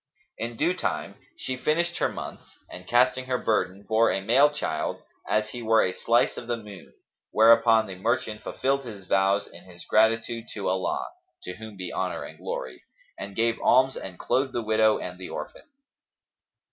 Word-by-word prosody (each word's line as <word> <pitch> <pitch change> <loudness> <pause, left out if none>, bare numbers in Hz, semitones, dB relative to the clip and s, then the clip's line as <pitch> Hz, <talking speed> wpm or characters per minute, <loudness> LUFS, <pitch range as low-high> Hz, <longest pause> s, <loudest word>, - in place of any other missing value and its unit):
In 115 0 -4
due 165 +7 +2
time 185 - -3 0.2
she 130 - -3
finished 170 +6 0
her - - +2
months - - -9
and, 90 0 -10
casting 130 +2 +3
her 130 -1 0
burden, 100 -4 -1
bore 110 +1 +3
a - - 0
male 125 +9 +5
child 145 - -3 0.3
as 110 0 +1
he 120 - -6
were 110 -1 +4
a 90 - 0
slice 120 +5 +2
of 120 - -7
the 120 -1 -1
moon; 105 -4 -12 0.3
whereupon 115 0 +5
the 95 - -7
merchant 110 +2 -1
fulfilled 135 +1 -1
his 105 -6 -9
vows 95 +2 +2
in - - -15
his 90 -2 -12
gratitude 115 +1 +2
to 100 - -3
Allah, 95 0 -1 0.4
(to 90 - -6
whom 110 -2 -10
be 90 -1 -5
honour - - -2
and - - -10
glory!) - - -5 0.4
and 100 - -7
gave 115 0 +1
alms 130 +1 +4
and 90 -2 -7
clothed 135 0 0
the 120 - -2
widow 110 0 +3
and 90 0 -7
the 95 - -7
orphan. - - -8
115 Hz, 180 wpm, -26 LUFS, 100-125 Hz, 0.4 s, male